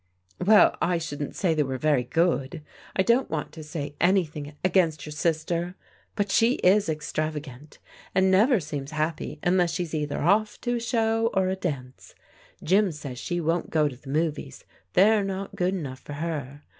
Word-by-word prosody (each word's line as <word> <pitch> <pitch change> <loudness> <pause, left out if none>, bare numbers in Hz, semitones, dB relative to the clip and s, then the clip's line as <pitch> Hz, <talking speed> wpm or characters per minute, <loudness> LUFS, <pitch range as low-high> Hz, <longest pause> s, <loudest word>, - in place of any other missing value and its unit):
" 90 - -34
Well, 210 +2 +6
I 175 -1 +2
shouldn't 145 -3 -5
say 175 -4 +1
they 155 - +1
were 135 -2 -2
very 145 -2 +2
good. 155 0 0 0.3
I 190 - +3
don't 235 +5 +2
want 155 -2 -3
to 160 - -9
say 150 -2 -5
anything 155 -5 +1
against 175 -4 +2
your 150 - -7
sister, 170 +3 -1 0.4
but 205 -2 -1
she 230 +2 +4
is 195 -1 +4
ex 155 -1 -3
travagant, 150 -2 -5 0.4
and 190 0 +4
never 220 +5 +4
seems 145 -4 -5
happy 155 0 -3
unless 175 -1 +2
she's 175 -3 -3
either 150 -2 -2
off 210 +6 +2
to 240 - -1
a - - -2
show 225 -1 +1
or 190 -1 +2
a 190 - 0
dance. 140 -9 -6 0.5
Jim 195 +3 +3
says 140 -5 -7
she 175 -1 -2
won't 165 +1 -1
go 155 -2 +2
to 140 - -6
the 135 +2 -13
movies, 150 - -2 0.3
they're 210 +2 +5
not 195 0 -4
good 180 +2 0
enough 135 -7 -5
for 145 - -9
her. 145 -2 -5
165 Hz, 180 wpm, -26 LUFS, 150-190 Hz, 0.5 s, Well